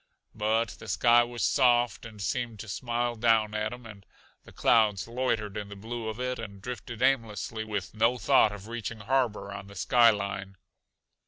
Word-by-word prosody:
But 110 +1 +1
the - - -11
sky 120 0 +5
was 120 0 -4
soft 120 -4 +2
and 110 -2 -13
seemed 115 +2 -3
to 110 - -9
smile 120 +3 -2
down 110 -2 +2
at 105 0 -1
him, 120 0 -9
and 105 -3 -11 0.4
the - - -14
clouds 105 -5 +3
loitered 115 -4 -1
in 105 -1 -5
the 100 - -8
blue 115 +3 -6
of 110 +1 -5
it 125 -1 -2
and 100 -3 -8
drifted 120 +1 -6
aimlessly 115 -4 0
with 105 -4 -4
no 115 +3 +2
thought 110 - +4
of 105 0 -9
reaching 115 -1 -5
harbor 110 -4 0
on 100 0 -8
the 100 - -13
sky 120 +4 +5
line. 100 -2 -3
110 Hz, 180 wpm, -28 LUFS, 105-120 Hz, 0.4 s, sky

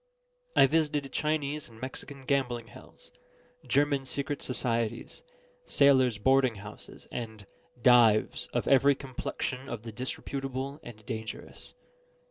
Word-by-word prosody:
I - - +8
visited 150 -2 0
Chinese 150 -2 -1
and 115 -1 -15
Mexican 135 +2 -7
gambling 125 -4 -1
hells, - - -15 0.6
German 140 -1 +2
secret 140 +1 -2
societies, 115 - -2 0.5
sailors' 130 -5 +4
boarding 130 +2 +3
houses, 105 +1 -10
and 110 -4 -6 0.4
"dives" 120 -4 +5
of - - -2
every 140 +1 +5
complexion 130 0 -4
of 115 -4 -5
the 115 - -6
disreputable 135 +3 -4
and 110 -3 -12
dangerous. 110 -2 -7
130 Hz, 110 wpm, -29 LUFS, 115-140 Hz, 0.6 s, I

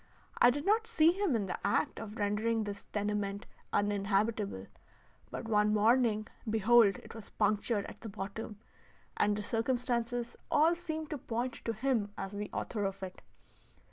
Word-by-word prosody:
I 240 - +8
did 285 +5 -1
not 440 +3 +3
see 330 -8 +5
him 375 -6 0
in 210 -3 0
the 185 - -4
act - - +1
of 220 0 -7
rendering 220 +2 +1
this 205 -1 -6
tenement 205 -1 -2 0.3
uninhabitable; 205 - 0 0.6
but - - -6
one 210 -1 +3
morning, 220 0 +3 0.2
behold 220 -2 +5
it - - -12
was 225 -2 -10
punctured 210 0 +1
at - - -10
the 225 - -6
bottom, 205 +2 -6 0.6
and 205 - +2
the 210 - -3
circumstances 240 +1 -1
all 315 +3 +5
seemed 315 -3 -5
to 300 - -3
point 240 +2 -2
to 230 - 0
him 225 -2 0
as 195 0 -4
the 205 0 -4
author 210 -4 -3
of 195 0 -3
it. 185 -1 -7
220 Hz, 160 wpm, -32 LUFS, 205-245 Hz, 0.6 s, I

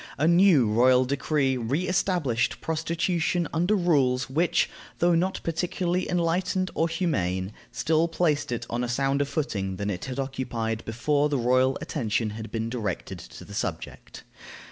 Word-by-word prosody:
A 155 - +2
new 170 -6 +5
royal 125 +4 +4
decree 135 0 0
re 135 +10 -1
established 155 - 0
prostitution 165 +1 -1
under 175 +6 +2
rules 135 -9 +2
which, 165 +5 +2 0.3
though 175 0 +3
not 180 +3 +1
particularly 175 +2 -1
enlightened 180 +2 0
or 165 - +1
humane, 95 - -1 0.2
still 160 +1 +1
placed 150 -5 0
it 120 0 -3
on 120 +1 -2
a 120 - -2
sounder 135 +3 +1
footing 105 - -2
than 100 +2 -2
it 90 - -5
had 130 -1 -5
occupied 120 -5 -3
before 145 +6 +1
the 145 - 0
royal 130 +2 +2
attention 115 -9 -1
had 110 +1 -7
been 115 0 -2
directed 115 -3 -4
to - - -11
the - - -11
subject. - - -5
140 Hz, 150 wpm, -26 LUFS, 120-170 Hz, 0.3 s, new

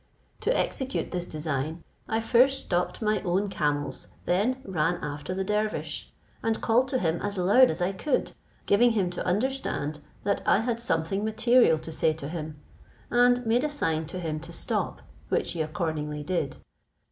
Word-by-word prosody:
To - - +1
execute 265 0 -2
this 175 -1 -2
design, 155 +1 -3 0.3
I 225 +1 +1
first 255 +4 +4
stopped 180 +2 -1
my 215 0 +1
own 190 +2 0
camels, 145 -5 -1 0.2
then 215 +9 +1
ran 175 -2 +1
after 150 +2 -5
the 190 - -1
dervish, 210 +2 -2 0.3
and 225 -1 0
called 240 +3 +3
to 260 -1 0
him 165 -6 0
as 205 -1 -3
loud 205 +9 +6
as 170 +3 -1
I 180 - +1
could, 255 +8 -1 0.3
giving 235 +3 +4
him 190 -5 +1
to 180 - -4
understand 195 - -1 0.2
that 200 0 +1
I 210 - +5
had 235 0 -1
something 195 -2 0
material 225 -4 +4
to 160 - -7
say 155 0 +2
to 155 -3 -6
him, 155 -3 -6 0.5
and 245 0 +4
made 235 +4 +3
a 300 - +1
sign 160 - -1
to 180 +3 -5
him 160 -3 -3
to 165 +2 -10
stop, - - -2 0.3
which - - 0
he 165 - -2
accordingly 155 -2 -2
did. 150 -3 -2
185 Hz, 170 wpm, -27 LUFS, 160-230 Hz, 0.5 s, loud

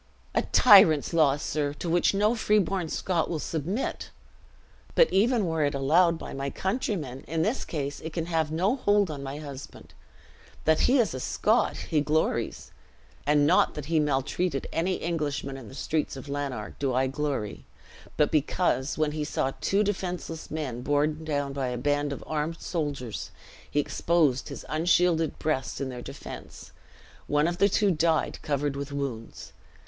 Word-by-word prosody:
"A - - +3
tyrant's 185 - +6
law, 150 -4 +4
sir, 145 -1 -2
to 170 - -5
which 170 +1 +3
no 210 +3 +3
freeborn 195 -6 +1
Scot 170 -1 -1
will 165 - -1
submit! 165 - -3 0.9
But - - +5
even 225 +1 +3
were 160 -2 0
it 145 0 0
allowed 165 +5 +3
by - - -8
my 135 0 -3
countrymen, 185 - -3
in 160 +1 0
this 225 +8 0
case 145 -3 -4
it 160 - -6
can 165 +1 -3
have 160 -3 0
no 185 +9 +1
hold 205 -7 +2
on 145 -2 -6
my 140 +1 -5
husband. 145 -2 -9 0.7
That 160 0 +4
he 270 - +4
is 235 -5 +2
a 130 - -4
Scot, - - +1
he 150 - 0
glories: 155 +2 -1 0.6
and 145 0 +4
not 175 +5 +3
that 150 - -5
he 160 - +5
maltreated 145 +2 0
any 180 +3 0
Englishman 150 -5 -2
in 130 -4 -9
the 130 - -11
streets 150 +2 -1
of 135 - -9
Lanark, 140 -2 -4
do 135 -3 0
I 130 +1 +3
glory; 135 -5 -3 0.5
but 150 - +3
because, 150 -2 +1
when 155 -1 +1
he 150 0 -3
saw 135 -3 -1
two 200 +2 +2
defenseless 180 -5 -4
men 140 -6 -4
borne 150 +3 0
down 145 -3 -2
by 135 -2 -2
a 125 0 -3
band 145 +3 0
of 140 - -5
armed 155 +2 -2
soldiers, 145 - -4 0.4
he 145 - 0
exposed 145 -3 +1
his - - -8
unshielded 165 0 +2
breast 135 -5 -2
in 135 - -2
their 125 -1 -6
defense; - - -9 0.6
one 150 +2 +2
of 175 +1 -2
the 200 - +5
two 205 0 +3
died, 160 -1 +1
covered 145 -1 -1
with 140 0 -5
wounds. 135 -6 -5
155 Hz, 170 wpm, -27 LUFS, 140-175 Hz, 0.9 s, tyrant's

